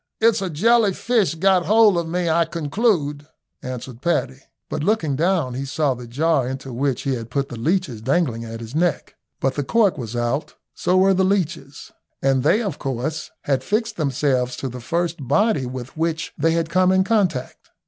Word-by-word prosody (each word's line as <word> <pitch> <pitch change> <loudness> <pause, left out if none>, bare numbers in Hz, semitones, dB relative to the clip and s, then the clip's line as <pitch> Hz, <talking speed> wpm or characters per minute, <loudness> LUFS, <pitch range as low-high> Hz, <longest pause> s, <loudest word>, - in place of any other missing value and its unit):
"It's 225 -1 +3
a 190 - -2
jelly 215 +5 +3
fish 225 -8 +1
got 185 +1 +2
hold 215 -1 +5
of 170 -1 -1
me, 175 +1 -1
I 165 +1 +3
conclude," 155 -3 -1 0.3
answered 125 -1 -7
Paddy; 135 -5 0 0.3
but - - -3
looking 165 -8 +1
down 165 -4 +1
he 130 +2 -3
saw 140 +1 0
the 125 -1 -9
jar 140 +1 +1
into 130 -1 -6
which 135 +1 -1
he 135 - 0
had 115 -2 -5
put 140 +3 -2
the 120 - -6
leeches 150 - -1
dangling 130 -3 0
at 115 0 -7
his 115 +2 -8
neck, 165 0 0 0.3
but 135 0 0
the 145 - -2
cork 200 - +2
was 115 -1 -5
out, 120 +5 -2 0.2
so 180 - +1
were 190 +1 +5
the 190 0 +2
leeches, 170 -7 -2 0.3
and 135 -1 +2
they, 220 - +3
of 195 -9 -4
course, 135 +4 -3
had 135 -2 0
fixed 220 - -1
themselves 130 -4 0
to 135 - -4
the 125 0 -8
first 170 0 -2
body 145 - +2
with 125 0 -7
which 160 +1 -2
they 165 +1 +1
had 165 -1 0
come 185 +1 +4
in 190 0 +4
contact. 190 - -1
155 Hz, 190 wpm, -22 LUFS, 130-185 Hz, 0.3 s, hold